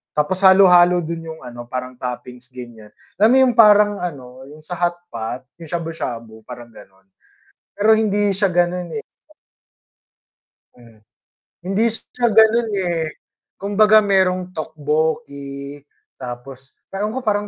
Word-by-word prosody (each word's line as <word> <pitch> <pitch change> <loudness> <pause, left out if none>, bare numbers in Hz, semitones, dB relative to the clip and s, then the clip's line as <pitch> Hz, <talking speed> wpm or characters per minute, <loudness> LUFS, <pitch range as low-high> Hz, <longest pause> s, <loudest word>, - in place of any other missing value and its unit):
tapos 150 +5 0
halo-halo 180 -2 +6
dun 165 0 -6
yung 160 0 -9
ano 120 -1 -10
parang 125 0 -6
toppings 125 0 -7
ganiyan, 120 -4 -12 0.3
alam 215 +2 +5
mo - - +5
yung 250 -2 +1
parang 210 -2 +5
ano, 130 -6 -8
yung 155 +1 -15
sa 175 +2 -7
hotpot 175 -10 -4 0.2
yung 165 - -10
shabu-shabu 125 -10 -6
parang 120 -1 -10
ganon, 95 -3 -18 0.7
pero 220 +2 +3
hindi 205 -2 +1
siya 195 0 +1
ganon, 175 0 -1
eh 220 - -5 1.7
mm, 115 -2 -19 0.7
hindi 195 +4 0
siya 240 +2 -3
ganun, 220 +2 +4
eh, 175 -5 -1 0.5
kumbaga 210 +2 +4
merong 185 -3 0
tteokbokki 145 - -4 0.4
tapos 130 +1 -9 0.2
ewan 210 +3 -2
ko 260 - -4
parang 205 -1 0
170 Hz, 125 wpm, -19 LUFS, 130-200 Hz, 1.7 s, halo-halo